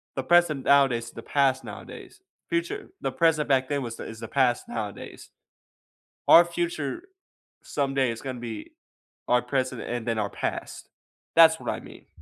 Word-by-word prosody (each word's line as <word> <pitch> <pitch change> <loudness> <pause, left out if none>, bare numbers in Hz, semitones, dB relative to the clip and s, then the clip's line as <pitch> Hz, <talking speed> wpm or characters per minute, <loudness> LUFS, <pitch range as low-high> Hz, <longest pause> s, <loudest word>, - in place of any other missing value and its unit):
The 135 - -2
present 165 -3 +3
nowadays 135 -4 +4
is 115 - -10
the 115 - -10
past 135 -2 +1
nowadays. 420 - -10 0.3
Future 350 +4 -2
The - - -1
present 160 -3 +2
back 130 -1 +2
then 145 -1 0
was 115 -1 -7
is 110 0 -8
the 115 - -6
past 125 -2 +1
nowadays. 105 -3 -6 1.0
Our 170 - +9
future 170 - -3 0.6
someday 135 -3 0
is 115 - -7
gonna 130 -2 -5
be 115 -3 -7 0.6
our 125 0 +3
present 130 0 -2
and 120 -1 -4
then 115 -2 -1
our 100 -1 -1
past. - - -5 0.5
That's 160 -1 +7
what - - -5
I - - -2
mean. - - -14
135 Hz, 160 wpm, -26 LUFS, 120-155 Hz, 1.0 s, Our